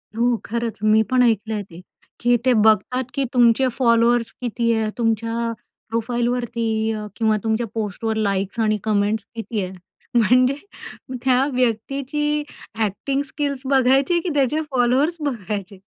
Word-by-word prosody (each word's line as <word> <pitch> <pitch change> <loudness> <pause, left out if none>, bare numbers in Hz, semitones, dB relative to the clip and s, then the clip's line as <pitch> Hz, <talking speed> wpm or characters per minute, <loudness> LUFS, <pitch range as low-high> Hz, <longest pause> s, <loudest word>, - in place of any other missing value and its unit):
हो, 240 +1 +2
खरंच 230 0 -3
मी 215 0 +5
पण 255 -1 +4
ऐकलं 225 -2 +1
आहे 210 -1 -2
ते 170 +2 -11 0.4
की 245 0 +3
ते 255 - +5
बघतात 220 +4 +3
की 275 - 0
तुमचे 245 +1 +4
फॉलोअर्स 235 -1 +3
किती 235 -1 0
आहे? 220 -1 0
तुमच्या 230 0 0 0.4
प्रोफाईलवरती 235 0 -1 0.2
अ, 215 -1 -4
किंवा 220 -2 +2
तुमच्या 225 +1 0
पोस्टवर 220 0 -2
लाइक्स 200 0 -1
आणि 215 -1 +2
कमेंट्स 210 0 0
किती 225 -1 -3
आहे? 185 - -5 0.5
म्हणजे 250 +4 +4 0.7
त्या 260 0 +3
व्यक्तीची 275 +5 -1 0.4
ॲक्टिंग 225 +6 -1
स्किल्स 285 -3 -3
बघायची 265 +3 +3
आहे 345 - +2
की 360 - -3
त्याचे 285 +2 +2
फॉलोअर्स 260 +6 +2
बघायचे? 210 - -4
235 Hz, 140 wpm, -21 LUFS, 220-255 Hz, 0.7 s, मी